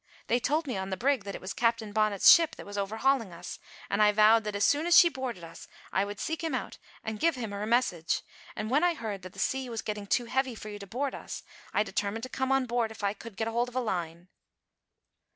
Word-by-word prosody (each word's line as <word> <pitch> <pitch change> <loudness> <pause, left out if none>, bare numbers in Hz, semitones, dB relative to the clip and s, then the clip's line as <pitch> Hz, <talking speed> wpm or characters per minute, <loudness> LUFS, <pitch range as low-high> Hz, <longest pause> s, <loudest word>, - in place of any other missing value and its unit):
They 240 - +2
told 305 +6 0
me 255 -8 -3
on 190 0 -4
the 190 - -3
brig 260 -1 +1
that 200 - -5
it - - -8
was 185 - -5
Captain 230 -3 0
Bonnet's 215 -2 +2
ship 330 -1 +5
that - - -10
was 205 - -8
overhauling 220 +3 0
us, 175 +1 -8 0.3
and 200 - 0
I 210 0 +6
vowed 215 +1 +5
that 210 -1 -3
as 200 - +2
soon 300 +4 +2
as 345 - +7
she 345 - +8
boarded 255 - -5
us 165 0 -11 0.3
I 190 +2 +2
would 205 0 -7
seek 320 +1 -3
him 325 - -1
out - - -5 0.2
and 220 -1 -4
give 330 -2 +2
him 230 -5 -5
her 205 +1 -4
message; 220 -9 +1 0.3
and 215 +2 -4
when 295 +5 +3
I 350 -1 +3
heard 210 -9 -5
that 185 0 -10
the - - -17
sea 265 -1 -1
was 230 -2 -4
getting 210 -1 -4
too 240 - +1
heavy 260 0 -1
for 215 - -8
you 205 0 -7
to 200 - -9
board 265 +6 -2
us, - - -7 0.3
I 210 - +2
determined 215 +1 -3
to 255 - -5
come 265 +1 -1
on 270 -1 +3
board 240 -2 0
if 220 -1 -11
I 200 0 +1
could 215 -1 -11
get 220 - -1
hold 235 +2 0
of 245 - -17
a - - +2
line." 175 -6 -3
220 Hz, 260 wpm, -29 LUFS, 200-255 Hz, 0.3 s, she